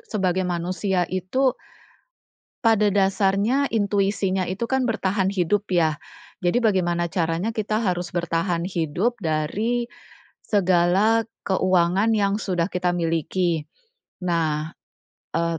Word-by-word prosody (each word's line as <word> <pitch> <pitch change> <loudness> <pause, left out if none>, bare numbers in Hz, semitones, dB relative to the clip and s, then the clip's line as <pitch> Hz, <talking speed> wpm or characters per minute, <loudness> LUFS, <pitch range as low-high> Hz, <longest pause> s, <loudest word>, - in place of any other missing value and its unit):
sebagai 190 -4 -1
manusia 180 +2 -1
itu 250 +9 +1 1.1
pada 220 -3 +3
dasarnya 200 +7 +2
intuisinya 200 -3 +1
itu 195 +5 -2
kan 265 0 +1
bertahan 195 -3 0
hidup 200 +2 +1
ya, 160 -3 +2 0.5
jadi 175 +8 +2
bagaimana 175 -6 +1
caranya 170 +5 -1
kita 215 0 -1
harus 180 -5 -1
bertahan 170 0 -1
hidup 175 +6 -1
dari 210 +10 -1 0.6
segala 195 +3 +3 0.2
keuangan 185 +3 +2
yang 200 -1 +1
sudah 180 -4 -1
kita 180 -1 0
miliki. 165 -1 -1 0.6
Nah, 160 -2 0 0.6
e 170 -1 0
185 Hz, 105 wpm, -23 LUFS, 170-210 Hz, 1.1 s, pada